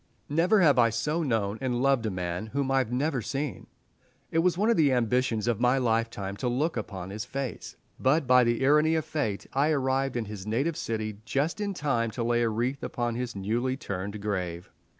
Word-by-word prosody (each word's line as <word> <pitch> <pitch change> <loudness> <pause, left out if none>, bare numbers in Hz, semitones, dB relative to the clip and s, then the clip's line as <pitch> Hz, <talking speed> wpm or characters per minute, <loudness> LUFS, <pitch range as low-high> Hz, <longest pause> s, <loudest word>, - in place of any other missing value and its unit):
Never 175 +8 +3
have 145 -7 +5
I 115 -1 +5
so 150 +9 -1
known 110 -7 -1
and 125 -2 -1
loved 135 -3 +2
a - - 0
man 90 +1 -3
whom 135 +3 -1
I 135 - +4
had 125 -3 -1
never 135 +1 0
seen. 135 +5 -4 0.6
It 165 - +2
was 175 +1 +2
one 215 +4 +3
of - - +3
the 150 -7 +4
ambitions 120 -2 +1
of 120 -3 +1
my 125 +2 +3
lifetime 115 -5 -1
to 125 - -2
look 145 +7 0
upon 95 -5 -5
his 105 +1 -4
face, 135 -3 -5 0.2
but 145 +3 +2
by 125 0 +6
the 120 +2 +1
irony 150 +3 +4
of 160 -1 0
Fate 145 -11 -2
I 140 +3 +2
arrived 135 -3 0
in 115 - -2
his 105 -1 -8
native 135 +9 0
city 110 -4 -3
just 140 - -1
in 200 -2 -2
time 130 -8 0
to 120 - 0
lay 120 0 +2
a 115 - +2
wreath 120 +5 -1
upon 120 -1 -2
his 120 -1 -4
newly 120 +7 -1
turned 100 -5 -5
grave. 90 -4 -3
125 Hz, 210 wpm, -28 LUFS, 110-140 Hz, 0.6 s, by